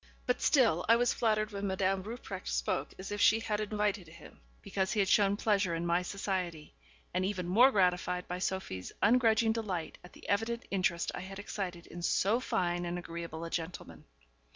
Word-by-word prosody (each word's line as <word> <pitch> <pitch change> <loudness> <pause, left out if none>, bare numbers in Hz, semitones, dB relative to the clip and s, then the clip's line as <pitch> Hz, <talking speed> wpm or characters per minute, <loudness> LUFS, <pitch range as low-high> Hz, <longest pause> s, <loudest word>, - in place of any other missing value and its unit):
But 250 0 0
still 225 - +4
I 230 - +8
was 245 +1 +2
flattered 215 -1 +1
when 200 0 -3
Madame 190 0 0
Rupprecht 230 +6 -7
spoke - - -1
as 190 +2 -7
if 205 0 -2
she 220 - +6
had 210 -2 -2
invited 210 -3 -1
him, 160 - -14 0.2
because 190 -1 -1
he 215 - 0
had 195 - +3
shown 200 0 +4
pleasure 200 -5 +1
in 165 +1 -2
my 170 +1 +2
society, 180 -4 -3 0.4
and 185 - 0
even 185 -2 -2
more 230 +9 +6
gratified 180 -4 +1
by 180 +1 -4
Sophie's 180 - -3
ungrudging 225 0 +4
delight 200 -7 -3
at 180 - -14
the - - -13
evident 225 +4 0
interest 180 -3 0
I - - -5
had 190 +1 -8
excited 185 -4 -5
in 175 - -9
so 200 +6 +2
fine 175 -7 -1
and 175 0 -3
agreeable 170 -1 -6
a 165 - -7
gentleman. 160 - -5
190 Hz, 185 wpm, -32 LUFS, 175-215 Hz, 0.4 s, I